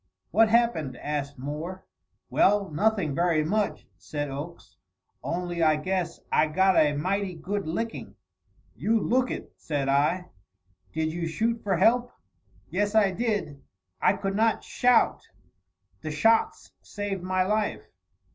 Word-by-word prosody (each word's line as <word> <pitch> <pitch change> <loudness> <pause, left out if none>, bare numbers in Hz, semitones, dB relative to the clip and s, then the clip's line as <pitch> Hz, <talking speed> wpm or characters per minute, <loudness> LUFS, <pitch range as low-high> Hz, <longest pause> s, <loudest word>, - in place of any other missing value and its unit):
"What 225 0 +5
happened?" 215 - +1
asked 145 -1 -4
Moore. 155 +8 -6 0.5
"Well, 200 -2 +3
nothing 195 -2 +1
very 170 0 +2
much," 205 +6 -1
said 145 -2 -4
Oakes; 145 - -8 0.5
"only 175 0 -3
I 155 -1 +5
guess 175 +2 -2
I 155 - +4
got 190 +4 +3
a 150 -1 +4
mighty 185 +5 -1
good 190 +3 -4
licking." 225 +8 -4 0.6
"You 225 +1 +1
look 255 +3 +1
it," - - -6
said 140 -3 -2
I. 150 +6 +1 0.6
"Did 160 +5 -1
you 170 -1 -3
shoot 230 +7 -1
for 195 -3 0
help?" 245 +5 +3 0.6
"Yes, 205 +2 0
I 205 -3 +5
did. 185 - -2 0.4
I - - +4
could 195 0 -3
not 225 +1 +2
shout. 245 -2 +2 0.7
The - - -5
shots 225 +10 +2
saved 205 -2 -4
my 185 +1 +1
life." 210 +2 -1
185 Hz, 135 wpm, -27 LUFS, 155-210 Hz, 0.7 s, What